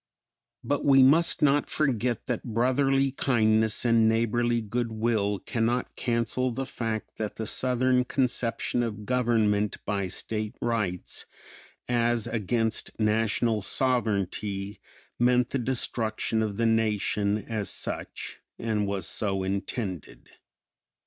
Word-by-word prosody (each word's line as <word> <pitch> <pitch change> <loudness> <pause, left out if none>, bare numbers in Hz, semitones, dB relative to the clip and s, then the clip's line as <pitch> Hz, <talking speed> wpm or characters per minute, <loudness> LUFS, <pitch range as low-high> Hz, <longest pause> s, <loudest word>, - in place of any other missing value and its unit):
But 145 0 -1
we 135 -2 +6
must 160 +6 +4
not 145 0 +3
forget 125 -5 0
that 120 -3 -2
brotherly 135 +3 +2
kindness 110 -4 +2
and 115 -1 +4
neighborly 115 +1 +1
good 115 +2 -2
will 110 -2 0
cannot 120 +3 -1
cancel 120 +2 0
the 135 +3 -3
fact 115 -4 -4
that 110 -2 -4
the 110 - -4
Southern 125 +2 +2
conception 125 -2 0
of 105 -3 -4
government 110 -4 +1
by 100 -2 -1
state 105 +3 -4
rights, 110 -7 -2 0.6
as 120 -2 +1
against 115 +1 -2
National 110 +1 +1
sovereignty, 100 -4 -1 0.4
meant 125 0 +3
the 135 - 0
destruction 115 -3 0
of 105 -2 -2
the 115 - +1
Nation 105 -2 +1
as 110 -1 -3
such - - -4 0.2
and 105 -3 -1
was 100 -1 -2
so 95 -3 -1
intended. 95 - -4
115 Hz, 115 wpm, -27 LUFS, 105-125 Hz, 0.6 s, we